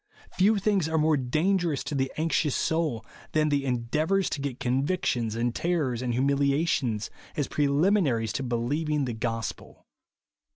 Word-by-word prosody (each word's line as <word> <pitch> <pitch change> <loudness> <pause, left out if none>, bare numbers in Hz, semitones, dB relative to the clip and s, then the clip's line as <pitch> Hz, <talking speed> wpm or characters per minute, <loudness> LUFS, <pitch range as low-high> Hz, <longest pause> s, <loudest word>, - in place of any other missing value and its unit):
Few 205 +4 +3
things 195 -5 +1
are 160 - +1
more 155 0 +3
dangerous 155 +4 0
to - - -5
the 135 -1 0
anxious 155 -2 +1
soul 155 -9 0 0.3
than 155 0 +2
the 140 -1 0
endeavours 150 +10 0
to 140 - -3
get 140 -2 -4
convictions, 130 -4 0
and 120 +1 0
terrors, 150 -9 -1
and 120 -2 -1
humilia 140 +4 +2
tions, 115 -9 -1 0.3
as 145 - 0
preliminaries 145 - +2
to - - -2
believing 140 +5 -1
the 120 - -3
gos 115 -1 -2
pel. - - -18
140 Hz, 155 wpm, -27 LUFS, 125-160 Hz, 0.3 s, Few